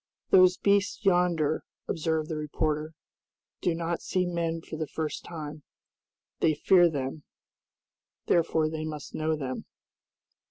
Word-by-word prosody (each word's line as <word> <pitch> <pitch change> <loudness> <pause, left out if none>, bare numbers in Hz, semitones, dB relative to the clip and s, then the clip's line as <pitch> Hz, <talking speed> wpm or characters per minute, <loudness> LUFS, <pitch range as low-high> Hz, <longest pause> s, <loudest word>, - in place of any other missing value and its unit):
"Those 185 -1 +7
beasts 200 +1 +1
yonder," 175 -5 +2 0.2
observed 160 -1 -1
the 160 - -3
reporter, 150 +1 -2 0.7
"do 175 -2 +1
not 170 0 -2
see 185 -1 0
men 170 -2 -1
for 160 - -8
the 155 -1 -3
first 155 0 -4
time. 155 -2 -7 0.8
They 155 -2 +3
fear 175 +3 +5
them, 140 0 -4 1.0
therefore 160 -2 +2
they 155 0 -4
must 155 -2 -6
know 155 0 0
them." 130 -4 -4
160 Hz, 125 wpm, -28 LUFS, 155-175 Hz, 1.0 s, Those